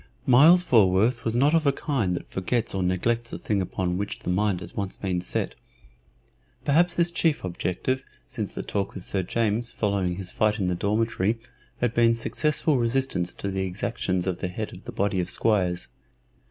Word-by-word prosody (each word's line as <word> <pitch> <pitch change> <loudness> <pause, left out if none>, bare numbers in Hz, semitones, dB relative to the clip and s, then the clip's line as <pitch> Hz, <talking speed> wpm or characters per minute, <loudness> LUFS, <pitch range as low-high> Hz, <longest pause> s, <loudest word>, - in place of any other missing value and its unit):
Myles 155 +8 +7
Falworth 110 - +3
was 115 0 -1
not 140 +5 +4
of 160 -3 +3
a - - +6
kind 125 - -1
that - - -6
forgets 110 +5 -1
or 95 - -1
neglects 115 +6 0
a - - -3
thing 100 -2 -1
upon 90 0 -2
which 100 0 -3
the - - -4
mind 100 0 +1
has 85 - -8
once 100 -2 -3
been 90 -3 -2
set. - - -2 1.1
Perhaps 170 +4 +3
his 170 0 +2
chief 165 -3 +1
objective 95 +8 -2 0.2
since - - -4
the - - -4
talk 100 -1 -3
with 95 - -6
Sir 95 - 0
James 115 +4 -1
following 100 -4 0
his 95 -1 -5
fight 110 0 +1
in 95 -4 0
the - - +1
dormitory 105 +2 0 0.4
had 120 -1 +1
been 115 -1 +4
successful 150 +4 +1
resistance 115 -7 0
to 100 - -4
the 95 0 -2
exactions 90 -2 -2
of 95 -2 -2
the 90 - -2
head 105 +4 -5
of 90 - -12
the - - -6
body 100 -1 0
of 90 0 -1
squires. 90 - +1
105 Hz, 190 wpm, -25 LUFS, 90-120 Hz, 1.1 s, Myles